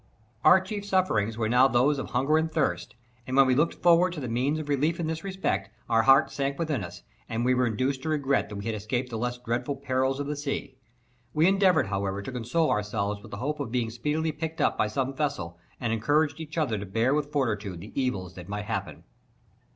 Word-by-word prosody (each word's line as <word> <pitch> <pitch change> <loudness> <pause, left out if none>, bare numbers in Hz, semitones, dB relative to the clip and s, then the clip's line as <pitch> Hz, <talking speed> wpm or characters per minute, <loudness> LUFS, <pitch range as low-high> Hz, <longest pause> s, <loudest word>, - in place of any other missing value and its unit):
Our 155 +5 +8
chief 200 +2 -5
sufferings 180 - +1
were 110 -2 0
now 125 +3 +5
those 135 +3 +2
of - - -5
hunger 140 +6 +2
and 160 0 -1
thirst, 155 -5 -1 0.3
and 130 +1 -1
when 135 - +8
we 130 - +3
looked 150 +6 +2
forward 175 +1 +4
to 165 - -5
the 130 - -4
means 130 +6 0
of 155 -2 -5
relief 150 +4 +1
in 170 - -1
this 160 +1 -3
respect, 185 - -2 0.2
our 115 -1 +3
hearts 135 +3 +5
sunk 140 0 -1
within 155 - -1
us, 85 -1 -9 0.3
and 115 +1 -1
we 130 - +4
were 125 -1 +2
induced 130 +4 -1
to 160 - -3
regret 140 -6 +1
that 105 - -7
we 100 - -6
had 115 - -1
escaped 120 +4 -3
the 115 - -3
less 125 +1 -2
dreadful 125 +3 -2
perils 135 0 0
of 145 - -2
the 150 +1 -3
sea. 140 -2 -4 0.6
We 155 +2 +4
endeavoured, 190 -3 +4
however, 100 0 -2
to 130 - -6
console 125 +7 0
ourselves 105 -1 -1
with - - -12
the 100 - -6
hope 150 +7 -3
of 140 -6 -4
being 120 -2 -1
speedily 150 +7 -1
picked 160 +2 -5
up - - +2
by 110 - +1
some 135 +5 -2
vessel 95 - -3 0.2
and 120 -3 -1
encouraged 145 +7 +1
each 160 0 -7
other 125 -10 0
to 100 - -5
bear 115 +7 +1
with 145 -1 -1
fortitude 105 - -1
the 105 - -11
evils 100 -10 -2
that 90 0 -10
might 105 0 -4
happen. 110 +1 -4
130 Hz, 230 wpm, -27 LUFS, 115-150 Hz, 0.6 s, Our